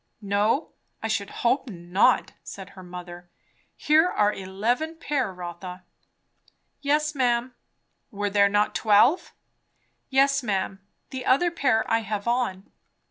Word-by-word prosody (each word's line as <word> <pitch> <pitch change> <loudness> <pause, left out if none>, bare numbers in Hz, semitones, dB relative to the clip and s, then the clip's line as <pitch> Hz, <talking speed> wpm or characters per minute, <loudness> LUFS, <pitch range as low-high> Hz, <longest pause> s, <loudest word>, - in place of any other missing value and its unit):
"No, 205 +8 +1 0.3
I - - 0
should 215 -2 -1 0.2
hope 260 +2 +2
not," 175 0 +2
said 195 -1 -9
her 190 - -13
mother. 175 -1 -10 0.5
"Here 315 +4 +3
are 210 -7 +2
eleven 225 +12 -2
pair, 285 - -1
Rotha." 180 0 -8 1.0
"Yes, 300 +1 +1
ma'am." 245 -2 0 0.6
"Were 205 -3 -3
there 200 0 +4
not 205 +1 +1
twelve?" 225 - +3 0.8
"Yes, 275 +1 +3
ma'am. 195 -3 -2 0.3
The 260 -1 -5
other 340 +7 +4
pair 255 -9 +1
I 225 - +2
have 210 -1 -4
on." 235 -6 -1
215 Hz, 125 wpm, -25 LUFS, 195-265 Hz, 1.0 s, there